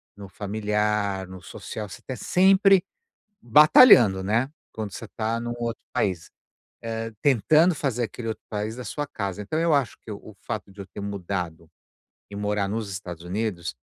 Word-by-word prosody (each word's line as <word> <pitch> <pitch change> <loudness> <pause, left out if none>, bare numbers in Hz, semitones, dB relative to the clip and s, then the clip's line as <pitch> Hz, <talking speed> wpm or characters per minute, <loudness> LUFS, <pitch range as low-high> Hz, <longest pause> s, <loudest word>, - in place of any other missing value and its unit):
no 100 -1 -10
familiar, 105 -1 -1
no 95 0 -10
social, 105 +3 -7
você - - -10
está 130 - -6
sempre 190 - +4 0.6
batalhando, 120 - +7
né, 115 +7 0 0.2
quando 110 -3 -5
você 115 - -7
está 110 +2 -2
num 120 0 -4
outro 115 -1 -4
país, 90 -5 -1 0.6
eh, 115 0 -3
tentando 155 - +4
fazer 125 -5 -1
aquele 115 0 -5
outro 110 - -6
país 105 +2 -3
a - - -5
sua 145 +6 -4
casa. 100 -7 -4
Então, 105 +10 -3
eu 165 -2 +2
acho 140 -4 +1
que 110 - -10
o 105 +1 -10
fato 105 -3 -5
de 100 - -10
eu 95 - -8
ter - - -10
mudado 90 -5 -4 0.6
e 100 - -7
morar 105 -1 -1
nos 110 0 -3
Estados 90 -3 -7
Unidos, 90 - -3
105 Hz, 170 wpm, -25 LUFS, 100-120 Hz, 0.6 s, batalhando